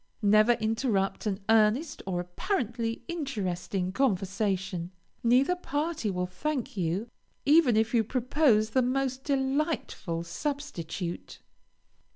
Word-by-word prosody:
Never 215 +3 +6
interrupt 220 -3 0
an 200 -1 -2
earnest 225 +8 +3
or 180 -2 -1
apparently 230 - -2
interesting 195 - -2
conversation. 195 -5 0 0.3
Neither 255 +9 +4
party 310 -7 -2
will 180 -1 -1
thank 255 +9 -3
you, 185 +4 -1 0.4
even 285 -6 +5
if 220 +2 +1
you 230 -2 +4
propose 240 -2 +2
the 260 - +3
most 260 +1 -1
delightful 270 - -1
substitute. 180 - -4
225 Hz, 105 wpm, -28 LUFS, 195-275 Hz, 0.4 s, Never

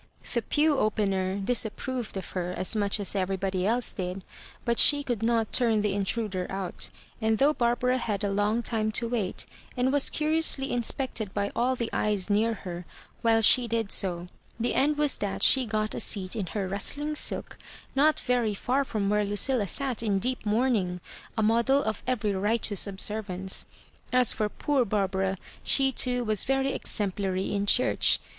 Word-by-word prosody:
The 235 - +1
pew 295 +4 +1
opener 195 -3 0
disapproved 230 +2 -1
of 190 - -6
her 180 -1 -3
as 185 - 0
much 205 0 +1
as 200 - 0
everybody 190 0 -1
else 235 +2 +1
did, 185 0 -5 0.4
but 235 -1 +1
she 290 -1 +5
conld 240 -6 -3
not 225 -1 0
turn 225 -4 +2
the 210 -2 0
intruder 200 -2 -2
out; 190 -2 -3 0.3
and 220 0 +1
though 285 +5 +3
Barbara 250 0 +1
had 210 -4 -3
a 200 - 0
long 210 +4 0
time 220 -2 -1
to 235 +2 0
vrait, 210 -6 -2 0.3
and 255 +2 +1
was 285 -1 +4
curiously 305 -3 +2
in 245 - 0
spected 225 -4 -2
by 200 0 -1
all 255 +2 +1
the 235 -2 -4
eyes 210 -1 0
near 220 +2 +2
her 175 -1 -6 0.4
while 225 -1 +3
she 245 +3 +6
did 225 -2 -2
so, 175 -2 +1 0.3
the 235 - 0
end 290 +2 +2
was 295 -2 +2
that 200 -1 -3
she 260 -3 +5
got 215 0 -1
a - - -4
seat 190 -1 -1
in 205 -5 -3
her 200 0 -3
rust 200 +8 -1
ling 300 +1 -3
silk - - -1 0.4
not 300 +3 +3
very 240 -4 0
far 260 +7 0
from 215 -6 -3
where 210 +1 +2
Ludlla 205 +1 +1
sat 265 -5 +1
in 210 -4 0
deep 250 +2 -3
mourning, 210 -5 0 0.4
a 220 - +1
model 235 +6 +2
of 215 -1 -3
every 215 -5 0
righteous 205 +1 +1
ob 195 -1 -7
servance. 190 -3 0 0.5
As 250 -1 +4
for 215 -1 -1
poor 280 +3 0
Barbara, 195 -2 -1 0.3
she 270 -1 +4
too 250 -1 +2
was 215 -4 +3
very 270 +1 0
exemplary 195 -2 -3
in 200 0 -1
church. 250 - +3
220 Hz, 180 wpm, -27 LUFS, 195-250 Hz, 0.5 s, she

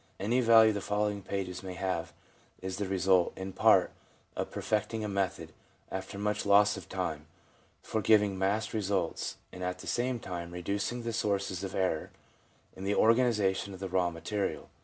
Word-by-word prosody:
Any 115 +6 +1
value 115 -2 +7
the 100 - -3
following 105 0 -1
pages 95 -2 -4
may 95 -1 -7
have 95 +1 -2 0.5
is 95 0 -5
the 100 - -2
result, 95 -1 +3
in 95 0 -5
part, - - +5 0.4
of - - -3
perfecting 110 +1 -1
a - - -2
method, 100 -2 -2 0.4
after 95 +1 -5
much 105 +1 -1
loss 105 +1 +5
of 95 -4 -10
time, 80 -5 -3 0.6
for 110 - -2
giving 105 -1 +4
massed 100 +4 0
results 100 -5 -1
and 90 - -7
at 90 0 -2
the - - -11
same 125 0 -1
time 85 -4 -6
reducing 100 +7 -2
the 115 0 -3
sources 100 -3 -1
of 95 - -5
error 90 -4 0 0.7
in 95 - -8
the 100 +1 0
organisation 105 -5 +3
of - - -12
the 95 -1 -4
raw 90 -1 +2
material. 95 +4 -3
100 Hz, 170 wpm, -30 LUFS, 95-105 Hz, 0.7 s, value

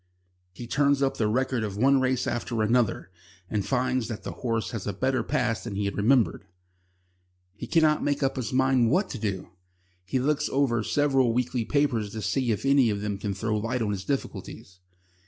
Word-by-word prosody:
He 120 +6 -9
turns 140 +2 +2
up 135 - 0
the 110 - +1
record 130 +1 0
of 100 -2 -4
one 135 +4 +4
race 130 -1 0
after 120 -2 -2
another, 115 -4 +1 0.4
and 105 -2 0
finds 130 -1 0
that 110 -3 -6
the - - -5
horse 115 -6 -2
has 110 -4 -5
a 100 - -1
better 130 +7 0
past 115 -2 -1
than 115 -4 -5
he 100 0 -1
had 100 - -2
remembered. 115 +3 +2 1.1
He - - -7
cannot 155 -2 +3
make 145 0 0
up 135 - +1
his 125 -5 -3
mind 130 -2 +3
what 185 - +1
to 125 - -5
do. 100 -4 -3 0.5
He 100 +9 -2
looks 150 +3 0
over 130 -4 +1
several 135 -3 +2
weekly 125 -1 -1
papers 125 -8 0
to 110 -1 -5
see 130 -3 0
if 110 +3 -1
any 135 -3 +4
of 100 -1 -2
them 105 -1 -3
can 100 -1 -3
throw 110 +2 -1
light 115 +3 -1
on 105 - -1
his 95 -2 -4
difficulties. 95 -8 -5
120 Hz, 195 wpm, -26 LUFS, 105-135 Hz, 1.1 s, one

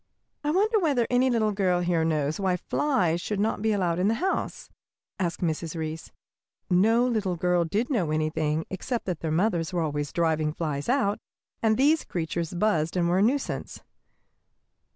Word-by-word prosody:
"I 295 - 0
wonder 420 +7 +3
whether 285 - +2
any 250 +1 +3
little 220 -3 +2
girl 185 -3 +1
here 175 -2 +1
knows 155 -1 0
why 185 -2 +1
flies 180 - 0
should 210 +2 -3
not 215 0 0
be 220 0 +1
allowed 180 -4 0
in 185 - +2
the 225 - +2
house?" 375 +8 -2 0.5
asked 175 -3 -2
Mrs. 165 -1 -2
Reece. 160 0 -5 0.6
No 225 +7 +4
little 215 -7 0
girl 175 0 +1
did 215 - -1
know 190 - +1
anything 155 0 0
except 230 +6 -3
that 180 -4 -3
their 160 - -3
mothers 170 0 +1
were 175 -2 -1
always 145 -2 -2
driving 160 -2 0
flies 150 -1 -3
out, 245 -6 +1 0.4
and 220 -1 +3
that 260 - +2
these 310 +2 +4
creatures 170 0 -3
buzzed 175 -4 +1
and 170 -1 +2
were 180 +2 +2
a - - +3
nuisance. 260 +7 -1
180 Hz, 175 wpm, -26 LUFS, 160-225 Hz, 0.6 s, No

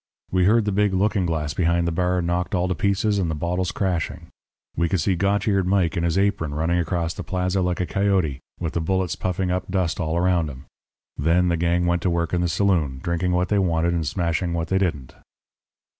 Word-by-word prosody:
We 90 -1 +3
heard 110 +2 +4
the 105 - 0
big 100 -1 +1
looking 100 -1 +1
glass 75 -3 -2
behind 85 -1 +1
the - - 0
bar 90 +1 0
knocked 90 +3 -1
all 90 0 +1
to 90 - 0
pieces 100 +3 +1
and 90 -4 0
the 80 - -2
bottles 90 +4 -1
crashing. 90 -5 -2 0.5
We 85 +1 +1
could 95 - +1
see 90 +4 +1
Gotch 100 +4 0
eared 100 -3 +2
Mike 95 -4 +2
in 85 - 0
his 85 +1 0
apron 95 -7 0
running 85 +3 +1
across 85 0 -1
the - - -6
plaza 90 +1 -1
like 90 -1 -1
a 90 - 0
coyote, 95 -8 0 0.2
with 85 -2 -3
the 85 - -1
bullets 95 0 0
puffing 90 0 -2
up 90 +1 -2
dust 90 -4 -1
all 80 -1 -1
around 85 -3 +2
him. 65 +1 -10 0.5
Then 85 +5 +2
the 85 - +2
gang 85 +1 +1
went 85 0 +1
to 90 - +1
work 85 -1 -1
in 90 - +1
the 90 - +1
saloon, 80 -8 +1
drinking 85 +1 0
what 90 0 +1
they 105 - +2
wanted 85 -2 +1
and 80 -3 -1
smashing 85 +1 -1
what 85 -1 -2
they 95 - +2
didn't. 75 -9 -2
90 Hz, 225 wpm, -23 LUFS, 85-95 Hz, 0.5 s, heard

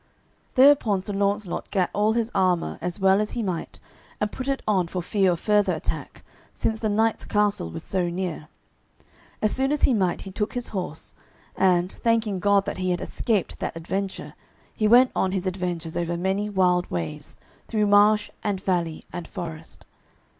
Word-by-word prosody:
Thereupon 255 -8 +5
Sir 205 - -5
Launcelot 200 -1 -1
gat 190 -3 0
all 210 +1 +2
his 230 0 -1
armour 185 -3 +1
as 180 +2 -3
well 190 +1 +4
as 215 - -3
he 235 - -2
might, 180 -4 -4 0.4
and 210 0 -1
put 260 - -6
it 275 -1 -1
on 190 -5 +2
for 180 - -4
fear 190 +1 +2
of 170 - -5
further 205 -2 +2
attack, 155 - -5 0.3
since 220 0 -1
the 220 - -1
knight's 220 +2 +1
castle 205 -2 0
was 165 0 -7
so 180 -2 -1
near. 170 -3 -4 1.0
As 215 - +3
soon 270 +1 +1
as 295 - -1
he 265 - +5
might 185 -5 +1
he 195 - -8
took 210 +2 -2
his 245 -1 -3
horse, 180 -6 -5 0.4
and, 180 -1 +2
thanking 225 -4 0
God 200 +1 +3
that 200 - -4
he 185 0 -1
had 180 0 0
escaped 215 -6 -2
that - - -4
adventure, 190 +4 -4 0.4
he 215 - +1
went 250 +3 +6
on 190 0 +1
his 190 -1 -2
adventures 175 -3 -3
over 170 0 -1
many 190 +4 -1
wild 180 -3 +2
ways, 85 -3 -5 0.3
through 215 -2 +1
marsh 210 +1 +4
and 205 -3 -1
valley 175 -4 -1
and 175 -1 -5
forest. 165 -3 -7
195 Hz, 180 wpm, -25 LUFS, 180-210 Hz, 1.0 s, went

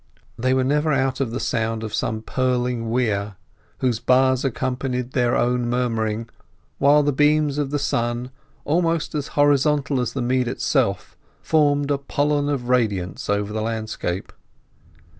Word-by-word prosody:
They 130 +2 +1
were 130 - +2
never 150 +4 +1
out 135 -1 0
of 135 -4 0
the 120 +3 -4
sound 115 -1 -1
of 110 - -5
some 110 -1 -2
purling 125 -2 -1
weir, 105 -4 0 0.5
whose 125 -4 +1
buzz 130 +1 +3
accompanied 125 -1 -2
their 120 -2 +1
own 120 0 +1
murmuring, 115 -2 -1 0.5
while 145 +2 +5
the 145 0 +1
beams 150 0 +2
of 145 -2 -1
the 145 - -1
sun, 120 -2 -1 0.3
almost 165 +1 0
as 150 -2 -2
horizontal 145 -1 +3
as 120 -1 -2
the 130 - -2
mead 125 0 +1
itself, 120 - -1 0.3
formed 145 -2 +2
a 140 - +1
pollen 145 +1 0
of 130 -4 -2
radiance 105 -10 0
over 105 0 0
the 110 - -2
landscape. 110 -5 -3
125 Hz, 150 wpm, -22 LUFS, 115-145 Hz, 0.5 s, while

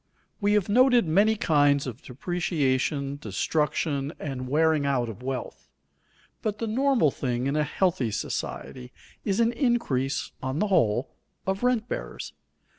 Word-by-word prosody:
_ - - -47 0.4
We 205 0 +3
have 210 -3 +2
noted 245 +1 +5
many 205 +7 +4
kinds 145 -7 +3
of 125 -1 -6
depreciation, 140 -2 -1
destruction, 145 - -1
and 130 -3 -4
wearing 155 +1 +3
out 130 -4 0
of 115 +2 -8
wealth; 130 -1 -5 0.7
but 215 -1 -2
the 230 - -2
normal 240 - +2
thing 125 -2 -2
in 140 +2 0
a 150 - +2
healthy 175 -6 0
society 125 +4 -5 0.3
is 200 +1 0
an 230 0 +4
increase, 235 - 0
on 130 +2 -2
the 210 +5 +1
whole, 125 - +2 0.3
of 190 +1 -1
rent 245 -2 +1
bearers. - - -5
150 Hz, 145 wpm, -26 LUFS, 135-205 Hz, 0.7 s, noted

